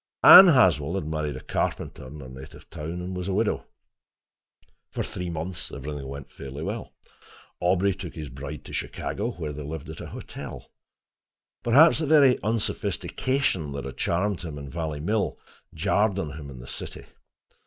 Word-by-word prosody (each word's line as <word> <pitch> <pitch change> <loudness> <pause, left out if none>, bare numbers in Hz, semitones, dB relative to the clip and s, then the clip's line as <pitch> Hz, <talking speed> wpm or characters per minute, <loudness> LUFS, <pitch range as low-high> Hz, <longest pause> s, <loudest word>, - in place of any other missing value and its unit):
Anne 190 - +12
Haswell 90 - +4
had 95 - -2
married 75 -1 -2
a - - -8
carpenter - - -3
in 75 +3 -9
her 65 - -9
native 65 +1 -11
town, 85 +4 -5
and 90 +1 -5
was 90 0 -4
a 95 - 0
widow. 110 +1 0 1.2
For - - -3
three 90 -1 -5
months 85 +2 -5
everything 70 0 -6
went 70 0 -8
fairly 70 +3 -7
well. - - -5 0.6
Aubrey 95 +2 +2
took 90 -3 -8
his 80 -2 -6
bride 70 +3 -8
to - - -10
Chicago, 105 +4 -3
where 75 -4 -5
they 75 - -6
lived 75 0 -6
at - - -9
a - - -7
hotel. - - -8 0.9
Perhaps 145 +9 +6
the 155 - -1
very 140 -4 +6
unsophistication 110 - 0
that 70 - -5
had - - -7
charmed 95 +2 0
him 80 -4 -6
in 70 -1 -8
Valley 80 -3 -3
Mill 105 +6 0 0.3
jarred 100 +4 +1
on 80 -6 -2
him 70 0 -8
in 65 - -10
the - - -10
city. - - -6
85 Hz, 170 wpm, -26 LUFS, 75-100 Hz, 1.2 s, Anne